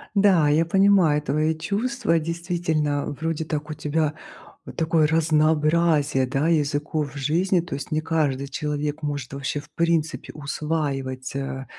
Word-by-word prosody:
Да, 185 -7 +4
я 160 +3 +3
понимаю 185 -5 +4
твои 155 +2 0
чувства. 205 +1 0
Действительно, 160 -4 -1
вроде 160 -1 -2
так 150 0 -4
у - - -3
тебя 150 0 -1 0.5
вот - - -10
такое 160 -2 +2
разнообразие, 155 -2 +2
да, 135 +4 0
языков 150 -2 0
в - - -9
жизни. 175 +7 +1
То 170 -4 -6
есть 140 +1 -7
не 155 0 +1
каждый 150 -4 0
человек 150 +1 -3
может 145 -3 -4
вообще 140 +1 -3
в 150 - -19
принципе 165 -1 0
усваивать, 140 -3 -3
э, 135 -1 -4
155 Hz, 145 wpm, -24 LUFS, 145-165 Hz, 0.5 s, Да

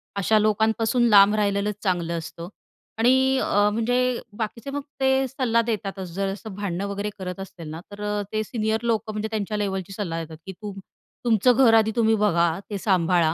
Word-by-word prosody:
अशा 210 +2 +3
लोकांपासून 220 +3 +2
लांब 205 0 +7
राहिलेलंच 205 0 0
चांगलं 170 -3 0
असतं 165 +1 -7 0.5
आणि 260 +3 +4
अ, 205 +1 +3
म्हणजे 245 +2 +1 0.2
बाकीचे 230 +4 -4
मग 285 0 -3 0.2
ते 265 0 +2
सल्ला 245 -3 +1
देतातच. 200 -5 -4
जर 195 +2 -1
असं 210 0 -9
भांडणं 200 -1 -3
वगैरे 200 +1 -3
करत 180 0 -5
असतील 175 -4 -8
ना 160 +2 -6
तर 205 0 -9
अ, 210 0 -1
ते 215 0 0
सीनियर 220 0 -1
लोकं, 225 -1 0
म्हणजे 215 +1 -2
त्यांच्या 210 0 -2
लेव्हलची 195 -2 -3
सल्ला 165 -5 -3
देतात, 160 0 -10
की 190 - -6
तुम 205 -2 -6 0.5
तुमचं 235 +2 +4
घर 225 - +6
आधी 220 -1 +4
तुम्ही 225 -1 +3
बघा, 170 -5 +3 0.2
ते 205 - -3
सांभाळा 175 -4 +2
210 Hz, 180 wpm, -24 LUFS, 190-225 Hz, 0.5 s, लांब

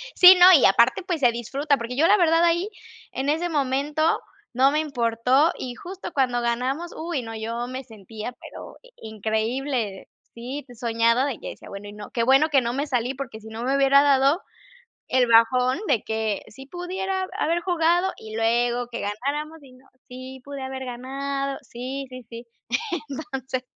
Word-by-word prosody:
Sí, 365 +1 +10
no, 355 - +9
y 300 - +6
aparte, 235 - +4
pues, 335 -5 -2
se 245 -2 +5
disfruta, 275 +5 -1
porque 235 +1 -5
yo 310 +4 +3
la 420 - +5
verdad 335 -1 +3
ahí, 345 +4 +2 0.4
en 270 +2 -2
ese 330 +4 0
momento, 290 +1 0 0.5
no 265 +3 +4
me 300 - +1
importó 255 +1 +2
y, 250 -1 -6
justo, 375 +9 -8
cuando 250 -3 +1
ganamos, 255 +8 -2
uy 325 -4 -3
no, 225 -1 -7
yo 230 +2 -4
me 260 +1 -6
sentía, 220 0 -8
pero - - -11
i - - -19 0.2
increíble. 220 0 -2 0.3
Sí, 255 +5 -6
soñada 230 +1 +2
de 275 -6 -3
que - - -7
decía: - - -11
"Bueno, 200 +1 -8
y 205 - -10
no 210 +2 -10
qué 235 -4 0
bueno 270 +5 +4
que 275 -3 +4
no 235 0 -2
me 280 +3 -1
salí, 250 -1 -1
porque 250 -5 -7
si 220 - -12
no 225 +1 -6
me 265 +2 +1
hubiera 275 0 +5
dado 280 +3 +3 0.7
el 255 -1 +3
bajón 250 +4 +4
de 225 - +1
que 220 -2 -2
sí 265 +5 -12
pudiera 375 +3 -3
haber 335 +2 +1
jugado 350 +1 +1
y 220 0 -9
luego 240 +2 +1
que 235 - -5
ganáramos 285 +10 -3
y 260 -2 -16
no" 255 +1 -20 0.2
Sí, 255 +1 -10
pude 280 -1 -7
haber 265 0 -5
ganado, 275 +2 -4
sí, 260 +3 -6
sí, 255 0 -9
sí. 235 0 -10 0.9
Entonces 260 -1 -3
260 Hz, 180 wpm, -24 LUFS, 235-290 Hz, 0.9 s, Sí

